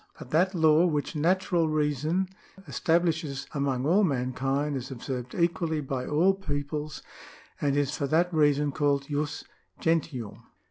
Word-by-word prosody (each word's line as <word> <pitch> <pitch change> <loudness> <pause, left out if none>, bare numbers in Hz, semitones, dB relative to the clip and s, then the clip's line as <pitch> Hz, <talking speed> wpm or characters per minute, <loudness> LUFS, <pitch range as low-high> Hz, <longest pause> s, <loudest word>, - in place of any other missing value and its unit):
But - - -11
that 185 +5 +2
law 160 +1 +5
which 150 -1 -2
natural 175 +1 +2
reason 155 +4 0 0.4
establishes 160 -2 0
among 140 -3 -1
all 185 +7 +4
mankind 135 0 0
is 130 -1 -5
observed 125 -1 -5
equally 170 -2 0
by 135 -3 -3
all 170 +6 +3
peoples, 150 -4 -4 0.6
and 145 -1 +1
is 145 0 0
for 140 - -2
that 170 +5 +2
reason 145 -2 +3
called 140 -1 +1
jus 145 0 -2 0.4
gentium.''' 155 -9 -1
150 Hz, 135 wpm, -28 LUFS, 140-165 Hz, 0.6 s, law